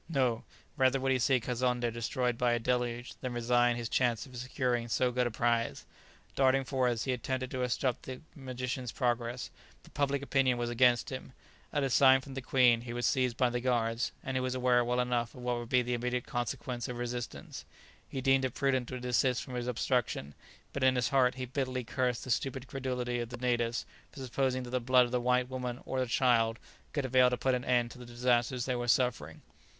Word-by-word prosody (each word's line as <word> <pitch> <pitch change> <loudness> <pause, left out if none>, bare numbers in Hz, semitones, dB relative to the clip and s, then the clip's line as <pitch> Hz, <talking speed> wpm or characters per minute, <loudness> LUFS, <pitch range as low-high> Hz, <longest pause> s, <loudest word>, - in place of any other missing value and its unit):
no, 130 -7 +1 0.3
rather 130 0 +3
would 135 0 0
he 130 - +2
see 130 +1 +3
Kazonndé 125 0 -1
destroyed 125 +1 -1
by 120 0 +2
a 120 - +1
deluge, 120 0 -1
than 130 -2 -3
resign 120 0 +2
his 120 -1 -3
chance 120 +1 +1
of 130 -2 -13
securing 125 -1 -1
so 125 +2 +1
good 125 0 +1
a - - -1
prize. 115 +1 0 0.5
Darting 135 0 +3
forwards 125 -4 0
he 130 - 0
attempted 130 +1 -3
to 130 - -3
obstruct 125 0 0
the 130 -1 -6 0.2
magician's 130 -2 -4
progress; 120 -1 -2 0.3
but - - -18
public 140 -1 0
opinion 135 -3 +2
was 120 0 -2
against 120 +1 +3
him; 130 0 -7 0.4
at 145 -2 0
a 135 - +1
sign 130 +1 +6
from 135 0 -10
the 135 - -4
queen, 125 -2 +4
he 120 0 -6
was 120 0 -2
seized 125 -3 +1
by 125 - +3
the 120 - -1
guards, 120 -2 0
and 130 - -4
he 130 - +1
was 130 0 -2
aware 125 -1 +3
well 125 +1 0
enough 120 -1 -1
of 125 - -10
what 125 -1 0
would 120 -1 -6
be 125 -1 +3
the 125 +1 -2
immediate 125 +1 -1
consequence 120 0 -3
of 125 - -5
resistance. 120 -1 -5 0.5
He 135 - -4
deemed 135 0 +3
it 130 -2 -2
prudent 130 -3 +1
to 130 - -5
desist 125 +1 +1
from 130 - -9
his 120 0 -3
obstruction, 120 - -1 0.4
but 140 - -2
in 130 0 +5
his 125 -1 +1
heart 130 -3 +3
he 130 -1 -4
bitterly 130 0 -2
cursed 125 0 -1
the 130 - -4
stupid 130 +1 -1
credulity 125 -2 -3
of 120 -1 -4
the 125 - -7
natives 120 -2 0 0.3
for 135 - -10
supposing 130 0 -1
that 120 - -8
the 125 - +1
blood 125 +1 +4
of 120 - -7
the 125 -1 0
white 125 0 +2
woman 125 -1 -4
or 130 - -2
the 130 - 0
child 115 -2 +2 0.3
could 145 -3 -1
avail 130 0 +5
to 125 - -1
put 130 +1 +1
an 125 -1 -1
end 120 -1 +2
to - - -12
the 125 - -9
disasters 120 +1 +1
they 130 - 0
were 120 0 -3
suffering. 115 - 0
125 Hz, 220 wpm, -31 LUFS, 120-130 Hz, 0.5 s, sign